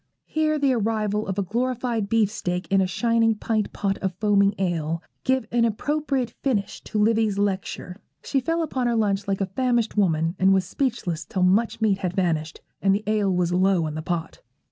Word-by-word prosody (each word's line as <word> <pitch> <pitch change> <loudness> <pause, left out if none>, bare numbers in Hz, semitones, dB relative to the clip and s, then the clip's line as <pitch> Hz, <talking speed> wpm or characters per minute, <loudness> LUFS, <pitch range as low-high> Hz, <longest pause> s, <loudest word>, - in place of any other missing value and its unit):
Here 310 0 0
the 280 -3 +2
arrival 215 -2 0
of 190 0 -3
a 200 - +1
glorified 235 0 -1
beefsteak 200 -5 0
and 195 0 +4
a 190 - +1
shining 230 +3 +2
pint 215 0 -1
pot 195 -1 -2
of 190 -2 -2
foaming 200 0 +3
ale 165 -3 -1 0.2
give 260 -2 +1
an 235 -1 +2
appropriate 270 +2 -1
finish 220 -8 -1
to - - -4
Livy's 215 -1 +2
lecture. 190 -2 -2 0.3
She 275 - 0
fell 330 +6 0
upon 260 -5 -1
her 235 - +1
lunch 205 -3 0
like 195 0 -1
a - - +2
famished 240 -3 +1
woman, 165 -3 +2
and 190 +1 +5
was 190 -1 +1
speechless 210 - -2
till 185 +4 -2
much 215 +5 +2
meat 205 -3 +2
had 180 -1 -3
vanished, 165 -4 -1 0.2
and 195 0 +3
the 210 - -3
ale 210 -2 +1
was 180 -1 +1
low 185 -2 +3
in 155 - -3
the 155 - -4
pot. 165 0 -4
205 Hz, 190 wpm, -24 LUFS, 185-230 Hz, 0.3 s, and